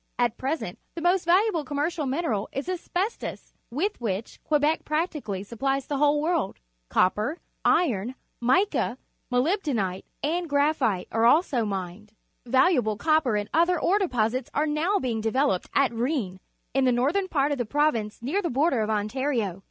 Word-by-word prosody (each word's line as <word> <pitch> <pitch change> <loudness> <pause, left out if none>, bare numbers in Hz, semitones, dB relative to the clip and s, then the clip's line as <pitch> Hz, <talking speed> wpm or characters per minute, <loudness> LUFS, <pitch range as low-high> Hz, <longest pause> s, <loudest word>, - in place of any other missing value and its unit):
At 240 -2 +1
present 260 - -3 0.2
the 335 - -5
most 355 0 +2
valuable 355 -1 +3
commer 285 +1 -1
cial 320 -5 -2
mineral 260 - -1
is 275 +4 -4
asbestos, 370 +3 -3 0.2
wi 315 - +1
th - - -29
which 210 -1 -3
Quebec 300 +1 +2
practically 300 - -2
supplies 270 +5 -2
the 285 - -2
wJiale__wQxkL 295 - +1 0.3
Cop 185 - +3
per,^ 230 +11 -2 0.3
irgn,_ 250 - +2 0.3
mica,^ 260 - +2 0.3
molybdenite^ 250 - 0 0.2
and 335 +3 -1
graphite 285 - +1
are 225 +1 +3
also 255 -4 +3
mined. 195 +1 -5 0.3
Valuable 255 - +3
copper 310 -5 +2
and 205 0 -1
other 345 +2 +3
ore 400 +4 +2
deposits 250 - 0
are 300 - +2
now 315 +7 +1
being 235 - -2
develope 225 -3 +1
d - - -19
at 270 -4 +3
Rou 235 +3 0
vn 200 -12 -2 0.3
in 270 0 +2
the 255 - +4
northern 290 +11 +1
par^of 285 -4 +1
the 245 - 0
province 235 -7 0
near 330 +11 0
the 345 - -2
border 270 0 +2
of 215 - -1
Ontario. 215 -2 -1
275 Hz, 160 wpm, -26 LUFS, 225-320 Hz, 0.3 s, the